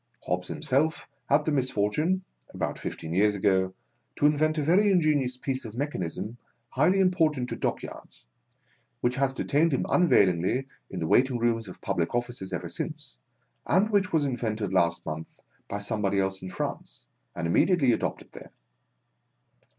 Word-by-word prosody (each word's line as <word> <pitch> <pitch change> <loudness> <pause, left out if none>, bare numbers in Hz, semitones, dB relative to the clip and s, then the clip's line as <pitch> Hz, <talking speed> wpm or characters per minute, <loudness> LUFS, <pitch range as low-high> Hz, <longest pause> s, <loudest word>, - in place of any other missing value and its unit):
Hobbs 90 0 -1
himself 150 +2 0 0.2
had 150 - +3
the 155 - +1
misfortune, 135 - 0 0.3
about - - -3
fifteen 80 0 -5
yeai's 105 +3 +3
ago, 95 -1 +1 0.4
to - - +1
invent 155 +1 +3
a 150 - +1
very 190 +7 +4
ingenious 150 -8 +2
piece 130 0 -3
of 110 -2 -8
mechanism 120 - -4 0.3
highly 165 +10 +3
important 160 -9 +2
to - - -3
dockyards, - - -5 0.8
which 125 +2 0
has 135 0 +2
detained 150 +4 +1
him 135 - +1
unavailinglyin 100 - +3 0.2
the 90 -3 -3
waiting 125 +6 +3
rooms 115 -2 0
of 90 - -11
public 85 +6 -1
offices 120 -5 -3
ever - - -3
since, - - -6 0.5
and 200 +5 +3
which 200 -3 +2
was 155 -3 +2
invented 110 -6 -2
last 85 -2 +2
month 80 0 -7 0.3
by 100 - -3
somebody 100 -1 -1
else 95 0 -1
in 95 - -6
France, - - -5 0.3
and 85 - -3
immediately 135 - +3
adopted - - -2
there. - - -11
125 Hz, 150 wpm, -27 LUFS, 95-155 Hz, 0.8 s, very